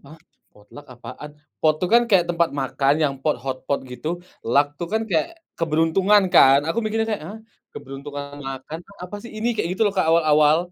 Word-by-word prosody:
apa 140 Hz, -, -16 dB, 0.5 s
potluck 105 Hz, +8 st, -15 dB
apaan, 145 Hz, +4 st, -10 dB, 0.3 s
pot 155 Hz, -1 st, +3 dB
itu 180 Hz, -, -1 dB
kan 240 Hz, -, +7 dB
kayak 185 Hz, -4 st, +5 dB
tempat 170 Hz, -1 st, +1 dB
makan 135 Hz, +1 st, +1 dB
yang 140 Hz, -2 st, +1 dB
pot, 155 Hz, 0 st, +1 dB
hot 130 Hz, -1 st, -3 dB
pot 140 Hz, -, 0 dB
gitu, 150 Hz, -, -6 dB, 0.4 s
luck 145 Hz, +2 st, +5 dB
itu 170 Hz, -, -5 dB
kan 220 Hz, 0 st, +1 dB
kayak 160 Hz, -3 st, +2 dB, 0.3 s
keberuntungan 165 Hz, +6 st, +3 dB
kan 135 Hz, +1 st, +7 dB
aku 165 Hz, -, -1 dB
mikirnya 220 Hz, 0 st, -1 dB
kayak, 205 Hz, -, -4 dB
ah, 220 Hz, -, -8 dB, 0.3 s
keberuntungan 140 Hz, +1 st, -8 dB
makan 135 Hz, +2 st, -6 dB
tuh 200 Hz, -, -17 dB
apa 195 Hz, +3 st, -7 dB
sih 235 Hz, -, -10 dB
ini 225 Hz, +2 st, -1 dB
kayak 210 Hz, -, -2 dB
gitu 190 Hz, -, -1 dB
loh 205 Hz, -, +1 dB
awal-awal. 155 Hz, -4 st, +4 dB
155 Hz, 190 wpm, -22 LUFS, 140-195 Hz, 0.5 s, kan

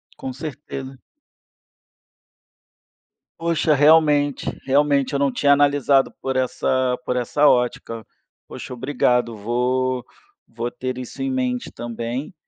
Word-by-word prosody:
Com 130 Hz, -, -6 dB
certeza. 135 Hz, -1 st, -7 dB, 2.4 s
Poxa, 165 Hz, -2 st, +1 dB
realmente 145 Hz, -1 st, +4 dB, 0.2 s
realmente 140 Hz, 0 st, +2 dB
eu 140 Hz, -, 0 dB
não 140 Hz, -1 st, +2 dB
tinha 140 Hz, +2 st, +3 dB
analisado 140 Hz, -1 st, +3 dB
por 135 Hz, 0 st, -2 dB
essa 130 Hz, 0 st, 0 dB
por 125 Hz, -, -1 dB
essa 125 Hz, +4 st, +2 dB
ótica, 120 Hz, -3 st, 0 dB, 0.4 s
poxa, -, -, -8 dB
obrigado, 125 Hz, -2 st, 0 dB
vou 125 Hz, +3 st, 0 dB, 0.4 s
vou 115 Hz, +1 st, -5 dB
ter 130 Hz, 0 st, -5 dB
isso 130 Hz, +2 st, -8 dB
em 135 Hz, -, -1 dB
mente 125 Hz, -1 st, -2 dB
também, 120 Hz, +3 st, -5 dB
130 Hz, 110 wpm, -22 LUFS, 125-145 Hz, 2.4 s, realmente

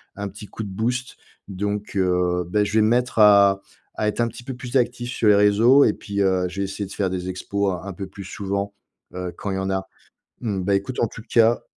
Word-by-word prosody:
un 100 Hz, 0 st, -4 dB
petit 105 Hz, +2 st, -10 dB
coup -, -, -8 dB
de 100 Hz, -, -6 dB
boost 120 Hz, +6 st, -2 dB, 0.3 s
donc 105 Hz, +2 st, -4 dB
heu, 90 Hz, -1 st, +1 dB
bah, 105 Hz, +4 st, +2 dB
je 105 Hz, -, -3 dB
vais -, -, +6 dB
me 110 Hz, -, +3 dB
mettre 125 Hz, +1 st, +1 dB
à 100 Hz, -2 st, +6 dB, 0.4 s
à 110 Hz, -, +1 dB
être 105 Hz, -, 0 dB
un 120 Hz, -, +2 dB
petit 115 Hz, +1 st, -9 dB
peu 130 Hz, -, -5 dB
plus 125 Hz, +1 st, -2 dB
actif 120 Hz, 0 st, -1 dB
sur 115 Hz, -, 0 dB
les 105 Hz, -, +7 dB
réseaux 110 Hz, +7 st, +5 dB
et -, -, +4 dB
puis, 100 Hz, 0 st, -4 dB
heu, 95 Hz, -2 st, +2 dB
je 95 Hz, +2 st, -5 dB
vais -, -, 0 dB
essayer 95 Hz, +1 st, -4 dB
de 95 Hz, -, -11 dB
faire 100 Hz, -2 st, 0 dB
des 90 Hz, 0 st, -4 dB
expos 100 Hz, +2 st, -1 dB
un 90 Hz, -, -6 dB
un 100 Hz, -, -5 dB
peu 95 Hz, +2 st, -6 dB
plus 100 Hz, +1 st, -10 dB
souvent, 100 Hz, +1 st, -3 dB, 0.4 s
heu, 90 Hz, -1 st, -4 dB
quand 100 Hz, -, -4 dB
il -, -, -2 dB
y -, -, -2 dB
en 95 Hz, 0 st, -2 dB
a. 95 Hz, 0 st, -2 dB, 0.5 s
Mmh, 105 Hz, -5 st, -2 dB
bah, 100 Hz, +2 st, +1 dB
écoute 120 Hz, +6 st, -3 dB
en 115 Hz, -, +3 dB
tout 110 Hz, -, -11 dB
cas 115 Hz, 0 st, +3 dB
100 Hz, 255 wpm, -23 LUFS, 95-115 Hz, 0.5 s, les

